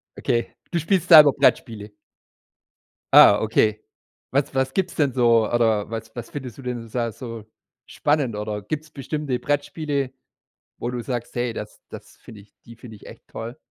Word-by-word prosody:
Okay. 115 -1 -2 0.2
Du 170 - 0
spielst 180 +1 0
selber 150 -4 +10
Brettspiele? 105 -2 0 1.2
Ah, 100 +1 +8
okay. 110 -1 +1 0.5
Was 135 +1 0
was 130 0 0
gibt's 190 - -1
denn 140 -5 +1
so, 115 -3 +3
oder 110 -3 +1
was 115 -1 -7
was 120 -2 -7
findest 130 -6 -8
du - - -10
denn 120 -3 -5
da 115 0 -2
so 115 -1 -9 0.4
spannend, 145 -7 -1
oder 105 0 -4
gibt's 155 +9 -5
bestimmte 140 -2 -4
Brettspiele, 145 -1 -2 0.7
wo 120 - -4
du 125 -1 -4
sagst: 120 -1 -5
„Hey, 120 -1 -1
das - - -8
das - - -12
finde 105 -2 -13
ich 100 - -23
die 115 - -13
finde 115 -1 -12
ich - - -17
echt - - -14
toll.“? 115 +2 -8
120 Hz, 165 wpm, -23 LUFS, 110-140 Hz, 1.2 s, selber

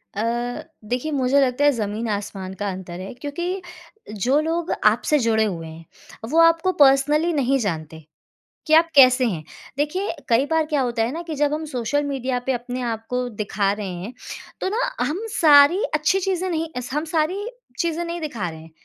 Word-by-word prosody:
अ, 210 - -1 0.7
देखिए 250 +6 -2
मुझे 270 -1 +2
लगता 260 +1 +1
है 290 - +6
ज़मीन 220 -2 -3
आसमान 200 -2 -4
का 205 0 -1
अंतर 185 -2 -7
है 190 +1 -7
क्योंकि 345 +8 -4 0.5
जो 245 +8 +1
लोग 330 +2 -2
आपसे 235 +8 +3
जुड़े 225 -3 +2
हुए 170 -6 -4
हैं, 160 +1 -11 0.4
वो 320 +4 +2
आपको 330 +2 +4
पर्सनली 290 +4 +4
नहीं 275 -2 +2
जानते 160 -7 -4 0.6
कि 310 - +4
आप 330 +1 +6
कैसे 255 -2 +7
हैं। 175 -9 -2 0.3
देखिए 320 +7 -1
कई 235 +3 +3
बार 320 0 +1
क्या 300 -2 0
होता 240 -3 0
है 230 +3 -1
ना 330 +3 -4
कि 320 - -4
जब 295 0 +1
हम 315 +1 -4
सोशल 290 +1 -1
मीडिया 265 -3 -2
पे 265 - +2
अपने 245 +1 -4
आपको 235 +2 -3
दिखा 205 -3 -1
रहे 205 -1 -5
हैं 185 +7 -7 0.5
तो - - -1
ना 435 +5 -1 0.3
हम 320 +7 -2
सारी 305 +3 +6
अच्छी 305 +5 +2
चीज़ें 375 -1 -1
नहीं 325 -1 -2 0.2
हम 300 +2 -1
सारी 345 +6 0 0.3
चीज़ें 340 0 -1
नहीं 340 0 -4
दिखा 235 - -3
रहे 160 -1 -10
हैं। 160 - -14
270 Hz, 185 wpm, -22 LUFS, 220-315 Hz, 0.7 s, कैसे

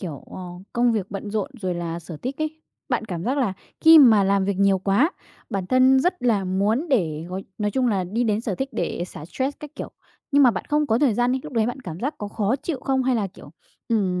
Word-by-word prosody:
kiểu, 160 -8 -7
ờ, - - -8 0.3
công 240 0 +3
việc 210 -4 -1
bận 200 +1 -5
rộn 215 +7 -2
rồi 185 -3 -1
là 170 -1 -4
sở 170 -1 -9
thích 255 - -5
ấy, 310 0 -4 0.3
bạn 245 -4 0
cảm 175 -5 -5
giác 265 +4 0
là 240 -8 +1 0.3
khi 320 0 +9
mà 225 -8 +7
làm 195 0 +2
việc 200 0 -1
nhiều 195 -1 +4
quá, 200 - +2 0.4
bản 195 -2 -2
thân 255 +3 +5
rất 360 +2 0
là 220 -6 +2
muốn 205 - 0
để 165 - +1
gói 185 +2 -5
nói 210 -1 0
chung 260 +2 +1
là 195 -5 0
đi 220 +7 -1
đến 215 -2 +1
sở 225 -4 -3
thích 265 +7 -3
để 175 - -2
xả 160 -4 -9
stress 260 - -3
các 300 - -8
kiểu. - - -6 0.4
Nhưng 285 -1 +5
mà 255 - +7
bạn 195 - -4
không 300 0 +2
có 225 -4 +2
thời 265 -5 +3
gian 245 +3 +2
đi, 260 - -1
lúc 300 - -9
đấy 225 -3 +2
bạn 245 +3 -4
cảm 175 -7 -7
giác 280 +5 -2
có 205 - -5
khó 210 +4 0
chịu 280 -1 -4
không? 265 -1 0
Hay 255 0 +1
là, 215 -4 0
kiểu, 180 - -14 0.4
ừm, 195 -6 +1
220 Hz, 260 wpm, -23 LUFS, 190-265 Hz, 0.4 s, khi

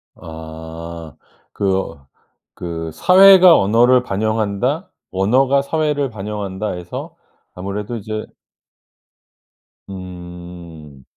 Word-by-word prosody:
아. 80 0 -9 0.4
그 100 -1 -1
어 75 -8 -6 0.5
그 80 -2 -5
'사회가 185 -1 +7
언어를 120 +5 +4
반영한다.', 110 - -1 0.2
'언어가 130 +8 +3
사회를 150 -2 0
반영한다.' 105 -1 -4
해서 90 0 -7 0.4
아무래도 100 +5 -5
이제 110 0 -5 1.6
음. 90 -5 -10
100 Hz, 175 characters per minute, -19 LUFS, 85-120 Hz, 1.6 s, 사회가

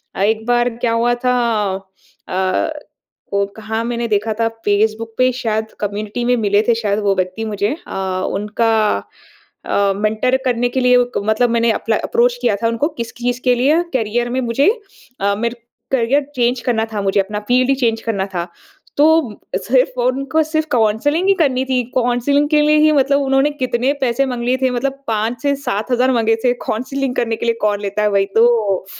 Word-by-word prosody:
अ, - - -3
एक 220 +1 +1
बार 240 0 +2
क्या 235 -1 0
हुआ 235 +1 +2
था? 250 - +3 0.9
अ, 185 - 0 0.6
वो 200 0 +2
कहाँ 220 +1 -3
मैंने 235 0 -2
देखा 215 0 0
था 230 - +2 0.2
फेसबुक 220 +2 0
पे 255 0 +3
शायद 220 -3 -2
कम्युनिटी 210 +3 -3
में 245 +1 +3
मिले 205 -2 +2
थे 235 - +5
शायद 210 -2 -1
वो 200 -1 +2
व्यक्ति 185 +4 -2
मुझे 210 +2 -1
अ, - - -7 0.4
उनका 210 +3 0 0.9
अ, 200 -1 +1
मेंटर 215 +5 +1
करने 245 -1 +1
के 260 - -1
लिए 250 0 +4
ओ 245 - +4
क - - 0
मतलब 220 +3 +2
मैंने 230 0 +2
अपला 220 0 -1
अप्रोच 245 +1 +2
किया 235 -4 +2
था - - +3
उनको, 230 +5 0
किस 235 -7 -6
चीज़ 245 +1 -2
के 250 -1 +3
लिए 285 +7 +3
करियर 240 0 0
में 255 +2 -1
मुझे 250 - +2 0.5
अ, 200 0 +1
मेरे 235 +3 -2 0.4
करियर 270 +3 +2
चेंज 245 0 +1
करना 230 -2 0
था 210 - -2
मुझे 195 0 +1
अपना, 210 +2 -1
फील्ड 250 +1 +3
ही 275 - +4
चेंज 230 -4 0
करना 200 -4 -2
था। 170 0 -2 0.5
तो, 320 +3 +5
म 210 - -10 0.3
सिर्फ़ 255 0 +1
उनको 270 +5 +1
सिर्फ़ 310 0 -2
काउंसलिंग 250 - +1
ही 395 - +6
करनी 265 -5 +2
थी, 260 -1 0
काउंसलिंग 255 +4 +2
के 300 -1 +4
लिए 300 +1 +4
ही 310 0 +5
मतलब 280 -1 +3
उन्होंने 270 +1 +2
कितने 255 -2 0
पैसे 260 +1 +1
माँग 250 -2 -4
लिए 250 +2 +1
थे 260 - +3
मतलब 270 +3 -3
5 225 +2 -1
से 285 -1 +1
7 240 -4 -3
हज़ार 250 +1 +3
माँगे 225 -2 +2
थे, 245 -1 +3
काउंसलिंग 255 +3 -3
करने 230 -1 0
के 220 - -5
लिए 230 -1 +1
कौन 205 -1 +1
लेता 200 +1 -2
है 210 - +2
वही 200 -1 +2
तो। 225 -5 +3
235 Hz, 195 wpm, -18 LUFS, 215-255 Hz, 0.9 s, ही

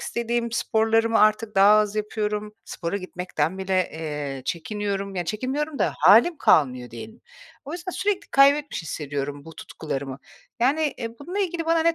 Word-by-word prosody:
istediğim 235 0 -2
sporlarımı 225 0 +2
artık 215 0 +2
daha 195 +1 +6
az 210 0 0
yapıyorum. 210 0 -2
Spora 170 +3 -4
gitmekten 180 -2 -3
bile, 190 -1 0
eee, 150 -4 -5
çekiniyorum. 200 +3 -3
Ya, 180 -2 -2
çekinmiyorum 270 - -3
da - - +1
halim 240 +11 +6
kalmıyor, 125 -5 +2
diyelim. 220 - -10 0.4
O 285 - -7
yüzden 355 +2 -5
sürekli 390 +2 -1
kaybetmiş 280 -3 +3
hissediyorum 145 -2 -5
bu 160 - -12
tutkularımı. 135 -3 -6 0.4
Yani, 290 +5 +2
eee, 230 -2 -4
bununla 355 +7 -5
ilgili 345 -4 -1
bana 330 0 +3
ne 335 0 +3
210 Hz, 150 wpm, -24 LUFS, 165-275 Hz, 0.4 s, daha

